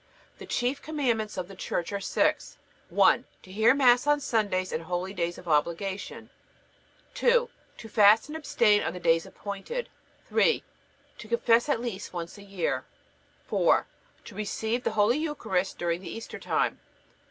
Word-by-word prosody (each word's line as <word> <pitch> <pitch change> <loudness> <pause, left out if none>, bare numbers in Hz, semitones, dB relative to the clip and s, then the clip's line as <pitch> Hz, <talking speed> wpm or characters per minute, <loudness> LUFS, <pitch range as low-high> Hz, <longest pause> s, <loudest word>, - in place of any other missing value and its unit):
The - - -10
chief 250 +3 -1
commandments 240 -10 -1
of 180 -1 -3
the 195 - -11
Church 185 0 -3
are 200 - -1
six: 195 - 0 0.3
1. - - +4 0.2
To 185 - -14
hear 220 +6 +4
Mass 250 -1 +4
on 295 0 +4
Sundays 205 -8 0
and 160 +1 -3
holydays 175 0 -2
of 180 - -12
obligation. 170 +6 -1 0.8
2. 485 0 +2 0.3
To 225 - -9
fast 215 +1 +5
and 300 - -7
abstain 275 -9 +3
on - - -2
the 180 - -7
days 165 -1 +2
appointed. 205 - -6 0.4
3. 470 - +2 0.6
To 215 - -9
confess 235 +3 +3
at 250 -5 +1
least 210 -6 -5
once 170 +3 -6
a - - -12
year. 175 -10 -2 0.6
4. - - +3 0.4
To - - -10
receive 220 +3 -2
the - - -1
Holy 220 +7 +4
Eucharist 220 - -2
during 170 0 -1
the 180 - -8
Easter 225 - -7
time. - - 0
210 Hz, 155 wpm, -27 LUFS, 185-245 Hz, 0.8 s, fast